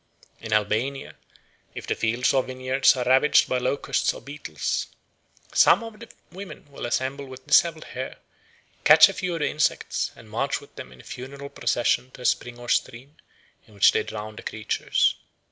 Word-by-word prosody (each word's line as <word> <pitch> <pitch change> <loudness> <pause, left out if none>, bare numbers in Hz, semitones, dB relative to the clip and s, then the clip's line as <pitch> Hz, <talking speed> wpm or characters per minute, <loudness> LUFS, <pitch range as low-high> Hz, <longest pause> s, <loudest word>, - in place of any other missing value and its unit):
In 110 - -8
Albania, 110 +6 0 0.6
if - - -7
the - - 0
fields 115 +3 0
or 135 - +4
vineyards 130 +1 +2
are 125 -1 -2
ravaged 130 +4 +4
by 130 - 0
locusts 140 +3 0
or - - -8
beetles, 145 +2 -4 0.7
some - - +5
of 225 -2 -10
the 230 0 -11 0.2
women 185 -4 -10
will 140 - -6
assemble 135 +3 -2
with 130 0 -12
dishevelled 155 +1 +3
hair, 130 +1 -6 0.7
catch - - +8
a - - -5
few 180 -2 -3
of 165 - -4
the 145 - +2
insects, 150 0 -1
and 115 -2 -15
march 125 +6 -2
with 140 - -18
them 65 - -9
in 65 - -15
a - - -21
funeral 140 +2 -8
procession 120 +1 0
to - - -12
a - - -7
spring 120 0 0
or 120 0 -11
stream, 130 +5 -2 0.5
in 105 - -19
which 100 - +6
they - - +1
drown 105 0 -7
the - - -7
creatures. 110 -1 0
130 Hz, 180 wpm, -24 LUFS, 120-140 Hz, 0.7 s, catch